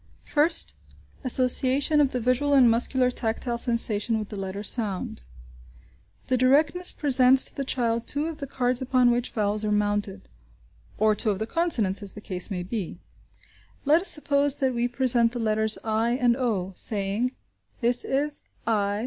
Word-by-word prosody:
First. 315 +3 +1 0.5
Association 260 +3 +2
of 275 -2 +1
the 250 - -3
visual 255 +4 0
and 260 -3 +6
muscular 250 +2 0
tactile 235 0 -2
sensation 230 -2 +2
with 215 -1 -6
the - - -8
letter 195 +1 -6
sound. 200 - -3 1.0
The 255 - 0
directress 295 +8 +3
presents 260 -2 +4
to - - -1
the 275 - -3
child 235 -3 -2
two 290 +1 -1
of 325 -2 -6
the 280 - -6
cards 250 -1 0
upon 255 -1 +2
which 240 0 -1
vowels 210 -1 0
are 210 - -1
mounted 205 -1 -2 0.7
(or 215 0 +2
two 215 +1 -1
of 200 - -1
the 220 - -3
consonants, 225 - 0
as 200 -2 -4
the - - -10
case 185 -3 -3
may 180 -3 -4
be). 185 -3 -6 0.9
Let 310 +4 +4
us 390 - +4
suppose 285 -2 +2
that 265 -2 -1
we 240 0 -1
present 245 -2 +1
the 245 - -5
letters 220 -1 0
i 225 +2 -1
and 245 -2 +1
o, 210 -8 -2
saying, 210 +5 -2 0.5
"This 245 +1 0
is 290 +2 -2 0.2
i! 205 -2 -1
240 Hz, 165 wpm, -25 LUFS, 215-265 Hz, 1.0 s, and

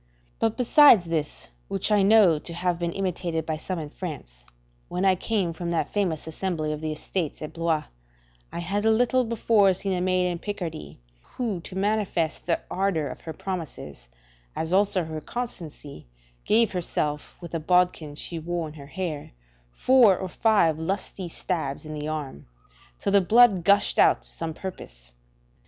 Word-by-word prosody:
[Henry - - -37
III.] - - -37
But 220 - -12
besides 250 - +6
this, 155 - -3 0.2
which 100 - -2
I 205 -1 +5
know 195 -6 +5
to 170 - -5
have 175 -1 -1
been 170 -1 -1
imitated 175 -4 -2
by 155 -1 -2
some 185 +3 -4
in 150 -3 -6
France, 140 - -8 0.4
when 180 +2 -2
I 190 - +5
came 185 -2 -1
from 170 +1 -5
that 170 -1 -1
famous 180 -7 -1
assembly 160 -1 -3
of 150 0 -4
the 155 -1 -2
Estates 155 +1 -4
at 155 - -7
Blois, 165 -2 0 0.7
I - - -6
had 195 +5 -2
a 220 - +4
little 245 +3 +3
before 220 -4 +3
seen 195 +1 -2
a 180 - -1
maid 185 0 +1
in 175 -1 -3
Picardy, 175 - -6 0.2
who 220 - -4
to 185 - -9
manifest 195 -6 -1
the 170 - +1
ardour 180 -6 0
of - - -9
her 160 - -6
promises, 155 - -7 0.5
as 160 +2 -2
also 195 -1 +3
her 160 -1 -6
constancy, 155 - -7 0.4
give 225 0 +3
herself, 150 -5 -2
with 170 -2 -10
a 165 - -1
bodkin 175 -3 +1
she 165 +2 -4
wore 170 0 -3
in 150 - -10
her 140 -3 -11
hair, 155 - -5 0.4
four 235 - +5
or 190 - -5
five 200 -8 +2
good 160 - -5
lusty 195 -1 -3
stabs 160 -4 -3
in 155 - -6
the 150 0 -4
arm, 150 - -5 0.5
till 200 - -1
the 200 0 +5
blood 210 -1 +5
gushed 200 +3 +4
out - - +5
to - - -5
some 160 -1 -4
purpose. - - -9
175 Hz, 180 wpm, -25 LUFS, 155-195 Hz, 0.7 s, besides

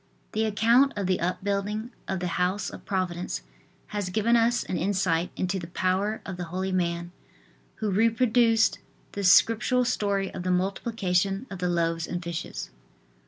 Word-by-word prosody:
The 220 +1 0
account 230 +6 +4
of 200 -2 -2
the 185 0 +1
upbuilding 200 +5 -2 0.2
of 190 -2 -2
the 180 -1 -2
House 185 +3 0
of - - -11
Providence 180 - -2 0.5
has 205 -3 -3
given 220 +5 +2
us 235 +1 +3
an - - -4
insight 180 -2 +1
into 190 +1 -1
the 170 - -7
power 190 +4 0
of 190 -2 -6
the 175 - -4
holy 185 +3 -3
man 175 -1 -1 0.6
who 215 -2 -2
reproduced 225 +2 +3 0.3
the 200 - -4
scriptural 230 +6 +5
story 200 -4 0
of - - -5
the 185 - -2
multiplication 195 +1 0
of 190 - -6
the 180 0 0
loaves 165 -1 0
and 175 0 -4
fishes. 170 -1 -5
195 Hz, 160 wpm, -27 LUFS, 180-220 Hz, 0.6 s, scriptural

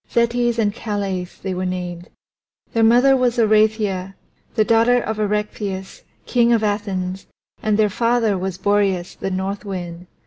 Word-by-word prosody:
Zetes 235 0 +1
and 210 -3 +1
Calais 200 -4 -3 0.2
they 190 -1 -2
were 185 +1 -3
named; 180 -1 -4 0.6
their 230 - +2
mother 245 +4 +5
was 250 -1 +1
Oreithyia, 215 -4 +2 0.4
the 215 -2 +3
daughter 230 +2 +4
of 220 -2 -4
Erechtheus, 205 -2 -3 0.2
King 240 -1 +3
of 225 -2 +2
Athens, 195 -3 -2 0.3
and 215 -1 +1
their 215 -1 +4
father 230 0 +1
was 185 -1 -3
Boreas, 195 -2 +1
the - - -4
North 190 +2 -3
Wind. 180 -3 -6
205 Hz, 145 wpm, -20 LUFS, 190-225 Hz, 0.6 s, mother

